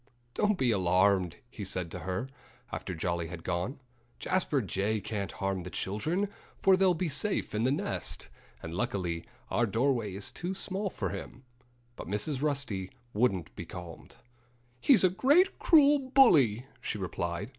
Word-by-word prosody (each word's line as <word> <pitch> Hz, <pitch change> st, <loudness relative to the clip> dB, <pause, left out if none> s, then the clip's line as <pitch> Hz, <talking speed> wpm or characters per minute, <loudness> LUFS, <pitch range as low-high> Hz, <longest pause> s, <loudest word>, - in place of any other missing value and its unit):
"Don't 210 Hz, +4 st, +2 dB
be 130 Hz, -6 st, +2 dB
alarmed!" 95 Hz, -2 st, +3 dB
he 110 Hz, -3 st, -8 dB
said 90 Hz, -3 st, -3 dB
to 90 Hz, -, -5 dB
her, 95 Hz, +6 st, -3 dB, 0.5 s
after 90 Hz, -, -4 dB
Jolly 85 Hz, 0 st, -2 dB
had 85 Hz, -1 st, -8 dB
gone. 90 Hz, +10 st, -2 dB, 0.4 s
"Jasper 170 Hz, -6 st, 0 dB
Jay 105 Hz, 0 st, -1 dB
can't 100 Hz, -2 st, -4 dB
harm 95 Hz, -1 st, -2 dB
the 90 Hz, -, -7 dB
children, 155 Hz, -, -1 dB, 0.3 s
for 190 Hz, -1 st, +5 dB
they'll 185 Hz, -1 st, +3 dB
be 175 Hz, +2 st, -1 dB
safe 200 Hz, +7 st, 0 dB
in 110 Hz, +2 st, +1 dB
the 130 Hz, -, +3 dB
nest. 145 Hz, -, -2 dB, 0.3 s
And 80 Hz, -, -6 dB
luckily 90 Hz, -4 st, -2 dB, 0.3 s
our 120 Hz, -, +2 dB
doorway 115 Hz, -2 st, 0 dB
is 100 Hz, -, -3 dB
too 180 Hz, +2 st, -4 dB
small 195 Hz, +1 st, -3 dB
for -, -, -3 dB
him." 130 Hz, -, -7 dB, 0.5 s
But -, -, -8 dB
Mrs. 115 Hz, -, -1 dB
Rusty 135 Hz, -11 st, -1 dB, 0.2 s
wouldn't 100 Hz, -7 st, 0 dB
be 85 Hz, -, -7 dB
calmed. 90 Hz, -2 st, -9 dB, 0.6 s
"He's 260 Hz, -, +6 dB
a 185 Hz, -, +6 dB
great, 290 Hz, -, +3 dB
cruel 295 Hz, -3 st, +6 dB
bully," 160 Hz, -, +5 dB, 0.2 s
she -, -, -3 dB
replied. 85 Hz, +1 st, -3 dB
105 Hz, 155 wpm, -30 LUFS, -, 0.6 s, He's